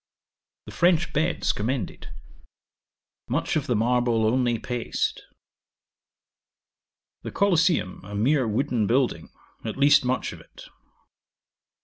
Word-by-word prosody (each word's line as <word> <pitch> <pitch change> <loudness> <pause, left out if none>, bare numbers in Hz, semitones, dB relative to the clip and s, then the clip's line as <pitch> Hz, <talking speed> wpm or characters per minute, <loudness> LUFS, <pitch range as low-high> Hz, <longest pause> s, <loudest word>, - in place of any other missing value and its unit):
'The - - -10
French 175 -1 +2
beds 160 +3 0
commended. 115 -1 -4 1.2
Much - - -1
of 155 - -1
the 125 - +1
marble, 120 0 +1
only 120 +1 +1
paste. 120 +1 -3 2.0
'The - - -6
Colosseum 170 - +1
a 100 +1 -8
mere 130 +4 +2
wooden 115 -1 0
building, 120 -9 0 0.3
at 110 +1 -5
least 145 +1 +5
much 125 0 -1
of - - -11
it. - - -15
125 Hz, 105 wpm, -25 LUFS, 115-145 Hz, 2.0 s, least